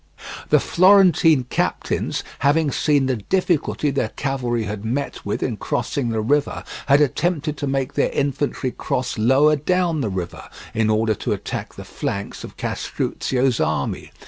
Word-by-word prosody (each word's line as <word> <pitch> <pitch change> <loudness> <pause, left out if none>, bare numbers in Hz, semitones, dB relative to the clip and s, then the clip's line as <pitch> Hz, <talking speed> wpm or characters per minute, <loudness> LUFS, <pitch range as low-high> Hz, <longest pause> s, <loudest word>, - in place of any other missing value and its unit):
The - - +5
Florentine 175 -6 +5
captains, 125 - -2 0.2
having 145 +2 +2
seen 145 0 +2
the 130 -2 0
difficulty 155 - 0
their 135 -5 -1
cavalry 125 -4 -2
had 105 0 -5
met 125 +6 -3
with - - -2
in - - -2
crossing 130 -4 -2
the 110 -1 -1
river, 145 +6 0 0.2
had 140 +1 +5
attempted 150 +1 0
to 145 - -3
make 135 0 -1
their - - +1
infantry 140 -2 -1
cross 125 -2 -3
lower 135 +7 +4
down 170 +1 0
the 110 - -1
river, 90 -3 -5 0.2
in 110 -1 +1
order 110 0 +2
to - - -2
attack - - -5
the - - -9
flanks 100 0 -4
of - - -10
Castruccio's 130 -2 -1
army. - - -1
135 Hz, 150 wpm, -21 LUFS, 120-150 Hz, 0.2 s, The